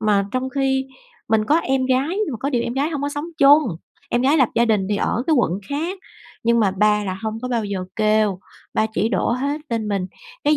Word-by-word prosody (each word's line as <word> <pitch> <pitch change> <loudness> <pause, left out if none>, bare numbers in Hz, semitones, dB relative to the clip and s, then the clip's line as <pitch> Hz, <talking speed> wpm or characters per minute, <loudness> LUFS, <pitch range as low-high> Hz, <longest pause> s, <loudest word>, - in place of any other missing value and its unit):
Mà 205 -2 +2
trong 255 +1 -1
khi 265 -1 0 0.4
mình 220 -1 +2
có 295 +8 +3
em 265 -4 0
gái 260 +3 +1
nhưng 385 -4 -1
mà - - -3
có 280 - -1
điều 240 -4 +1
em 235 - -3
gái 285 +4 0
hông 285 -3 -3
có 285 - 0
sống 290 +2 -4
chung, 285 +2 +7 0.5
em 240 - +1
gái 280 +4 +4
lập 260 -6 +4
gia 235 +1 +4
đình 210 -4 +1
thì 205 - +1
ở 230 - 0
cái 320 - +3
quận 235 - +2 0.2
khác. 330 +7 -3 0.5
Nhưng 235 0 +3
mà 200 -3 +3
ba 210 +2 +2
là 190 0 -4
hông 220 0 -3
có 250 - -3
bao 235 -3 -1
giờ 195 -2 -3
kêu, 215 -3 +2 0.4
ba 220 - +2
chỉ 220 - +1
đổ - - 0
hết 280 +4 -2
lên 225 -2 -2
mình, 195 -3 -1 0.4
cái 300 +1 +4
240 Hz, 245 wpm, -21 LUFS, 215-280 Hz, 0.5 s, chung